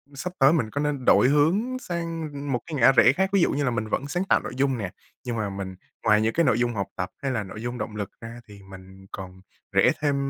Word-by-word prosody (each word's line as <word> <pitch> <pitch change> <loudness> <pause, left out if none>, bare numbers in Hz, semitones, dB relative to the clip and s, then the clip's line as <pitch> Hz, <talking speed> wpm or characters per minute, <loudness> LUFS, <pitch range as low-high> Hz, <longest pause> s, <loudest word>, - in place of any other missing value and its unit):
sắp 180 +6 -5
tới 135 +3 +6
mình 120 -10 0
có 145 +5 -3
nên 145 -4 -2
đổi 125 - +6
hướng 190 - +2
sang 165 - -4 0.2
một 125 - 0
cái 160 - -6
ngã 135 -1 +6
rẽ 120 -2 +6
khác? 190 +1 +1
Ví 195 - +4
dụ - - +3
như 145 +1 -1
là 125 - +1
mình 110 -2 -2
vẫn 140 +6 -2
sáng 175 +5 -1
tạo - - +5
nội - - -6
dung 135 -2 +1
nè, 100 -5 -4 0.3
nhưng 120 -2 -3
mà 105 -2 -1
mình 95 -1 -6 0.3
ngoài 105 0 +4
những 110 +1 +1
cái 170 - +2
nội 125 -4 +2
dung 120 -1 +1
học 100 -3 -2
tập 90 0 -4
hay 135 -1 -1
là 110 -4 -1
nội 105 +3 -9
dung 120 +1 -4
động 105 -1 -5
lực 100 -2 -4
ra 115 +1 -8
thì 100 -1 -13
mình 95 0 -13
còn 95 -1 -8 0.3
rẽ - - +4
thêm 145 -2 +1
125 Hz, 270 wpm, -25 LUFS, 105-150 Hz, 0.3 s, tới